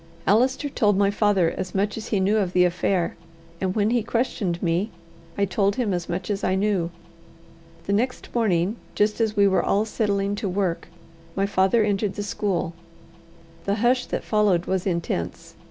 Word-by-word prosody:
Allister 255 +8 +2
told 210 -7 +2
my 200 0 +3
father 205 -5 +2
as 185 0 -5
much 200 +2 0
as 220 - -6
he 205 - 0
knew 200 +3 +2
of 190 -4 0
the 180 0 +5
affair; 180 0 0 0.5
and 190 -1 -1
when 210 0 +2
he 240 -1 +2
questioned 215 -6 -1
me, 175 +5 +1 0.5
I 200 - +3
told 195 +2 +1
him 235 -6 0
as 175 -1 -3
much 180 +4 -3
as 195 - -3
I 185 - +2
knew. 190 -4 +1 1.0
The 200 - 0
next 245 +5 -1
morning, 205 -3 +1 0.2
just 210 +2 +1
as 220 -1 +1
we 200 0 +6
were 190 - +3
all 205 +2 +2
settling 200 -3 0
to 205 -2 -2
work, 185 -2 -1 0.5
my 195 - +1
father 200 +3 +3
entered 205 -1 0
the 205 - -3
school. 195 -5 -2 0.9
The 200 - +1
hush 245 +3 +2
that - - -3
followed 205 -5 +2
was 190 +1 -1
intense. 165 - -3
200 Hz, 180 wpm, -24 LUFS, 185-215 Hz, 1.0 s, we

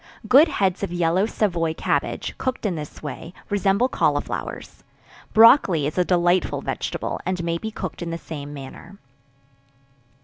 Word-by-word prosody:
Good 280 +6 +7
heads 195 - 0
of 200 - -3
yellow 175 +3 +1
Savoy 170 -8 -1
cabbage, - - -2
cooked 260 -3 -3
in 200 - +1
this 150 -2 -8
way, 165 +3 -7 0.2
resemble 200 +4 +2
cauliflowers. - - -2 0.5
Brocolli 220 - +6
is 150 - -3
a - - +5
delightful 175 0 +1
vegetable, - - -3
and 185 -1 -2
may 170 0 -1
be 220 - -4
cooked 185 -5 -6
in 170 - -4
the 165 - -3
same 145 -3 -8
manner. 135 -2 -10
175 Hz, 145 wpm, -23 LUFS, 165-205 Hz, 0.5 s, Good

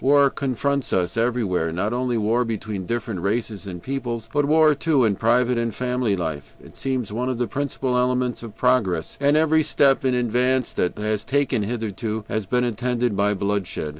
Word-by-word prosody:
War 140 0 +5
confronts 140 0 -1
us 90 -2 0
everywhere, 115 -8 0
not 95 +7 -1
only 125 -1 0
war 115 +3 +2
between 105 -4 -4
different 115 -4 -3
races 105 +1 -2
and 90 -3 -7
peoples, 120 -4 -4
but 145 0 +2
war 155 +1 +5
too, 145 -3 +2
in 105 -3 +2
private 120 +3 +2
and 115 0 -1
family 125 -2 -1
life. 80 -5 -5
It - - -16
seems 130 -6 -3
one 125 +3 -1
of 130 - -2
the 120 - 0
principal 130 +1 -2
elements 125 0 0
of 115 -3 -9
progress, 105 -11 +1
and 145 +2 +4
every 160 0 +4
step 140 -3 +2
in 130 -1 +2
advance 125 +1 +1
that 90 - 0
humanity 105 +1 -3
has 105 -1 -1
taken 135 -4 0
hitherto 110 0 -3
has 110 -3 -2
been 125 +4 +1
attended 120 -1 -1
by 105 +1 +2
bloodshed. 100 -5 -2
120 Hz, 190 wpm, -23 LUFS, 105-130 Hz, -, War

